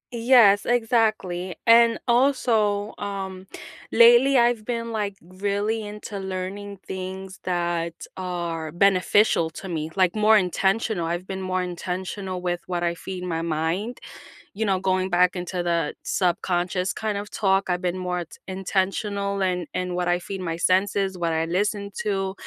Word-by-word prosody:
Yes, 230 -4 +5
exactly. 220 -7 +1
And 230 0 +6
also, 230 -5 +2
um, 190 -2 -5 0.4
lately 240 +4 +7
I've 235 -2 +3
been, 230 0 -3
like, 205 -3 -2
really 200 +5 -2
into 210 -1 -7
learning 190 +1 -5
things 190 0 -6
that 170 -2 -1 0.2
are 170 -4 -4
beneficial 190 -1 +3
to 190 - -8
me, 160 -2 -3
like, 185 0 +2
more 215 +1 +5
intentional, 190 0 0
I've 175 +2 -3
been 190 0 -5
more 185 0 -1
intentional 185 +1 -4
with 175 -1 -1
what 175 -1 -2
I 170 0 +1
feed 180 +1 -7
my 165 -2 -2
mind, 165 +8 -2 0.6
you 220 +1 -1
know, 190 -2 +1
going 185 0 0
back 180 +1 +3
into 180 0 -3
the 170 -3 0
subconscious 180 +1 0
kind 215 -2 -2
of 205 +1 -7
talk, 195 -2 +1
I've 180 +1 0
been 180 0 -1
more 180 -1 -2
t - - -16
intentional 195 +1 -1
in 180 -3 -1
in 180 -1 -2
what 180 0 -1
I 175 0 +3
feed 190 +2 -6
my 165 -2 -3
senses, 190 +1 +1
what 170 -1 0
I 160 0 0
listen 200 +3 -1
to. 195 -2 -1
190 Hz, 150 wpm, -24 LUFS, 180-205 Hz, 0.6 s, lately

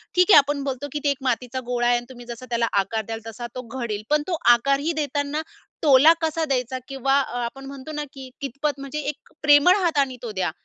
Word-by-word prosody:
ठीक 360 +3 +4
आहे - - +10
आपण 285 0 +3
बोलतो 275 +1 -4
की 295 - -3
ते 290 - +2
एक 275 - -3
मातीचा 255 0 -1
गोळा 240 -1 0
आहे 245 - +4
आणि 240 - -6
तुम्ही 245 -2 -11
जसा 240 +2 -7
त्याला 235 -1 +1 0.2
आकार 220 +2 -4
द्याल 225 0 -5
तसा 235 +2 -6
तो 255 - -4 0.2
घडेल. 215 -3 -3
पण 300 0 +3
तो 345 -3 -1 0.2
आकारही 275 +6 +1
देतांना 285 +2 -2 0.4
टोला 295 +2 +7
कसा 320 0 0
द्यायचा 255 -2 -1
किंवा 270 0 -1 0.3
आपण 270 +3 -6
म्हणतो 275 +2 -8
ना, 295 -1 -3
की 265 -2 -9
कितपत 280 +1 -3
म्हणजे 275 +2 -5
एक - - -26
प्रेमळ 295 +4 +6
हातानी 280 -6 +1
तो 230 - -4
द्या. 170 - 0
270 Hz, 215 wpm, -23 LUFS, 245-290 Hz, 0.4 s, आहे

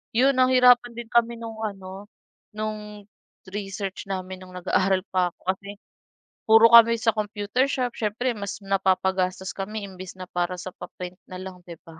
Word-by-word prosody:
'yon 265 +3 +5
nahirapan 250 -2 +5
din 235 -1 -8
kami 235 0 +3
no'ng 225 -1 -8 0.2
ano 190 +2 -10 0.5
no'ng 210 -1 -5 0.5
research 195 -1 -5
namin 190 -1 -5
no'ng 185 0 -13
nag-aaral 190 0 +2
pa 180 -2 +1
ako - - -72 0.2
kasi, 200 +1 -13 0.8
puro 225 +1 +8
kami 230 0 +9
sa 225 0 +1
computer 210 +4 0
shop, 250 -4 -1
siyempre 235 +4 0
mas 200 +1 -5
napapagastos 190 -1 0
kami 210 +2 -5
imbis 185 -1 -10
na - - -5
para 175 +1 -1
sa 185 - -6
pa-print 180 +1 -9
na 185 - -9
lang 185 -1 -8
'di 170 - -8
ba? 160 -1 -14
200 Hz, 160 wpm, -25 LUFS, 185-230 Hz, 0.8 s, kami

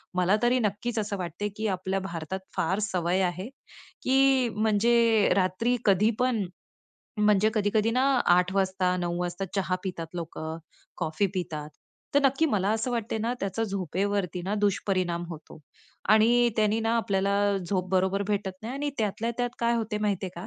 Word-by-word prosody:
मला 180 +2 +3
तरी 245 +1 +3
नक्कीच 225 +2 -1
असं 205 -1 -2
वाटतंय, 180 +3 -4
की 220 +1 -1
आपल्या 190 0 -1
भारतात 175 -1 -5 0.2
फार 190 +2 0
सवय 185 -2 0
आहे, 185 +2 -1 0.6
की 265 -1 +4
म्हणजे 220 +1 +3
रात्री 195 +6 +1
कधीपण, 215 +3 +2 0.7
म्हणजे 210 0 +4
कधी-कधी 215 +1 +2
ना, 255 +3 +2 0.2
8:00 180 +1 +4
वाजता, 190 -1 +1
9:00 175 -1 -2
वाजता 175 +2 -3
चहा 185 -1 0
पितात 170 -3 -5
लोकं, 160 -2 -5 0.4
कॉफी 160 +3 0
पितात. 155 -5 -4 0.4
तर 285 - +6
नक्की 275 +4 +3
मला 200 -9 +1
असं 225 +3 0
वाटतं 225 -2 -2
ना, 235 +2 0
त्याचा 195 +3 -2
झोपेवरती 195 -1 -2
ना 195 +4 -2
दुष्परिणाम 185 -4 0
होतो. 165 -1 -10 0.5
आणि 235 +3 +5
त्यानी 215 0 +2
ना 225 0 0
आपल्याला 200 -2 +1 0.2
झोप 185 0 -2
बरोबर 190 +1 +1
भेटत 205 -2 0
नाही 230 +3 -5
आणि 290 +1 -2
त्यातल्या 220 +2 -1
त्यात 245 0 0
काय 235 0 +2
होत 225 -2 -2
माहितीये 195 -3 -1
का? 175 - -6
200 Hz, 155 wpm, -27 LUFS, 185-225 Hz, 0.7 s, तर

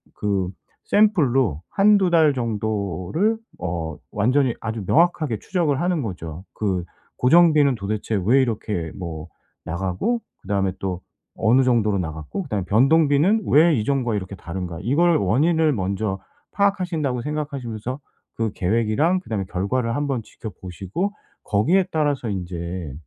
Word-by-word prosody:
그 100 -3 -1 0.4
샘플로 135 - +3
1-2 200 -2 +4
달 160 -4 +4
정도를 110 - -1 0.2
어 80 -3 -4
완전히 125 +4 +2
아주 110 -2 -4
명확하게 155 - +2
추적을 160 - 0
하는 175 -2 +1
거죠. 85 -5 -6
그 95 -4 -1 0.3
고정비는 150 -1 +5
도대체 105 0 -2
왜 130 +6 +5
이렇게 105 -9 -2
뭐 85 -3 -6 0.4
나가고 95 - -1 0.2
그다음에 95 -2 -1
또 95 -2 -3 0.4
어느 120 +4 +3
정도로 115 -5 +2
나갔고 80 - -4
그다음에 105 - -3
변동비는 150 - +3
왜 160 +3 +5
이전과 120 -1 0
이렇게 100 -1 -4
다른가? 85 -2 -6
이걸 165 +7 +3
원인을 155 - +2
먼저 95 -1 -2 0.3
파악하신다고 180 -10 0
생각하시면서 135 -5 -4 0.4
그 115 -2 -1
계획이랑 115 - +1
그다음에 110 - -3
결과를 115 +6 -1
한번 140 -5 -1
지켜보시고 100 - -5 0.3
거기에 170 - +2
따라서 145 -6 0
인제 90 -4 -5
115 Hz, 305 characters per minute, -22 LUFS, 95-150 Hz, 0.4 s, 고정비는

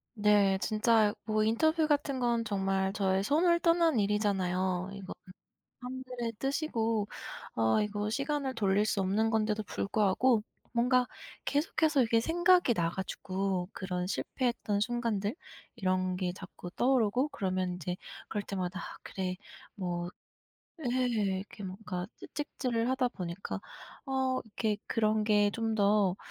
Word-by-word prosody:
네. 205 -2 +4
진짜 215 0 +3
뭐 215 -1 +2
인터뷰 315 +9 +3
같은 290 -3 +1
건 235 -2 +1
정말 195 -2 0
저의 195 -1 +1
손을 340 - +3
떠난 335 -6 +4
일이잖아요. 190 -3 +1
이거는 195 -1 -7 0.7
사람들의 250 -2 -5
뜻이고 230 -7 0 0.5
어 110 - +3
이거 210 0 -1
시간을 275 +2 -1
돌릴 205 -2 +2
수 215 -2 0
없는 205 +4 +2
건데도 215 -1 +1
불구하고 210 +4 +2 0.3
뭔가 250 +1 +3 0.4
계속해서 305 -1 +2
이게 230 -1 +3
생각이 345 -1 +4
나 170 -4 +1
가지고 190 0 -2
그런 180 -2 -3
실패했던 235 -2 -1
순간들 230 -1 -1 0.4
이런 185 -3 0
게 180 -1 -1
자꾸 185 -1 -9
떠오르고 250 +2 +2
그러면 185 -7 -1
인제 180 0 -4 0.3
그럴 210 - -2
때마다 185 -2 -3
'아 - - -8
그래 185 -1 -3 0.4
뭐' 175 -3 -3 0.8
예. - - -1 0.5
이렇게 205 +1 -9
뭔가 185 -1 -5
채찍질을 250 -5 -2
하다 260 -1 +2
보니까 180 -4 -5 0.4
어 265 -1 0
이렇게 220 -1 -1
그런 215 -1 +2
게 210 -1 +4
좀 225 +1 -1
더 200 -2 +3
215 Hz, 280 characters per minute, -31 LUFS, 190-250 Hz, 0.8 s, 네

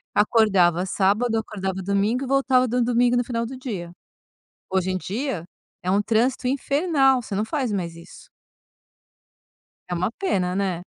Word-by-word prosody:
acordava 195 -5 +3
sábado, 215 +5 +1
acordava 190 -3 -4
domingo 200 +6 0
e - - -4
voltava 265 -1 +3
do 245 +1 0
domingo 245 +1 +2
no 245 - +2
final 235 -1 -2
do 255 +3 -7
dia. 205 -10 -6 0.8
Hoje 190 0 +1
em 185 - -1
dia 215 - -3 0.4
é 180 - 0
um 200 +2 +3
trânsito 240 +4 +1
infernal, 275 0 +2
você 215 -4 -6
não 205 - 0
faz 245 0 -2
mais 170 -4 -3
isso. 170 - -14 1.6
É 175 - -2
uma 180 +4 0
pena, 185 - 0
né. 190 -3 -1
220 Hz, 155 wpm, -23 LUFS, 190-255 Hz, 1.6 s, acordava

